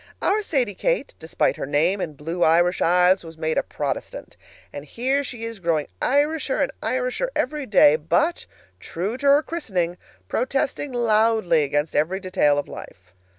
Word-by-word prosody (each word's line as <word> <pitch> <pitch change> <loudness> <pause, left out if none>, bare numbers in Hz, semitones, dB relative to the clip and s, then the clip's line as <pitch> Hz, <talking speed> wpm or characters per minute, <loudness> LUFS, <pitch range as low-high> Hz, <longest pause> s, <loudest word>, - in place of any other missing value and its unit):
Our 425 +2 +1
Sadie 265 - -1
Kate, - - -1
despite 160 - -1
her - - -4
name 165 +7 +1
and 155 -5 -5
blue 165 +4 -5
Irish 175 +3 +3
eyes, 180 +2 +4
was 165 -1 -11
made 160 0 0
a - - +1
Protestant. - - -5 0.4
And 145 - -7
here 260 - -1
she 240 -4 -7
is 230 -2 -7
growing 165 -4 0 0.2
Irisher 290 +1 +1
and 280 - +1
Irisher 255 - -1
every 300 -3 -2
day, 155 -7 +5
but, 310 - 0 0.3
true 190 +7 -4
to 285 - -1
her 285 +2 +5
christening, 185 - -3 0.3
protesting 270 - -1
loudly 220 -7 +2
against 145 +2 -1
every 170 +6 +1
detail 185 -7 +1
of 145 - -2
life. 90 0 -12
190 Hz, 160 wpm, -23 LUFS, 160-265 Hz, 0.4 s, day